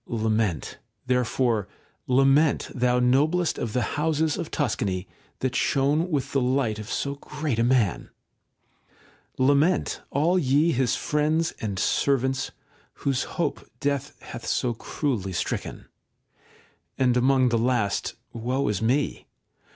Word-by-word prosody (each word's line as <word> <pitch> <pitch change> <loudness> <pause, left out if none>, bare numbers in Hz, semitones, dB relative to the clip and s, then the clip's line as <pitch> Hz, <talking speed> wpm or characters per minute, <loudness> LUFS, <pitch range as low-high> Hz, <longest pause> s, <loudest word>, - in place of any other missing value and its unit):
Lament, 110 -6 -1 0.3
therefore, 125 -3 +1 0.4
lament, 135 +4 +3
thou 125 -1 +2
noblest 150 +8 +2
of 115 -3 -3
the 125 - +1 0.2
houses 160 -1 +1
of 170 - -4
Tuscany, 100 - -1 0.3
that 130 -1 -1
shone 145 +6 +2
with 145 -6 -1
the 135 - +1
light 125 -4 0
of 105 +1 -7
so 140 +4 -2
great 145 -3 -4
a - - +3
man! 120 -6 +1 1.3
Lament, 145 +7 +2
all 165 +6 +2
ye 145 +3 +3
his 130 -3 +1
friends 155 +2 0
and 100 -3 -3
servants, 130 +4 +1 0.6
whose 135 -2 +1
hope - - -1 0.2
death 140 -2 -2
hath - - -8
so 120 -2 0
cruelly 115 -5 -3
stricken; - - -3 1.1
and 125 -2 +3
among 130 0 +3
the 115 -1 +1
last, 115 -4 0 0.2
woe 125 +4 -1
is 105 -1 -1
me 130 +6 0
130 Hz, 125 wpm, -25 LUFS, 115-145 Hz, 1.3 s, lament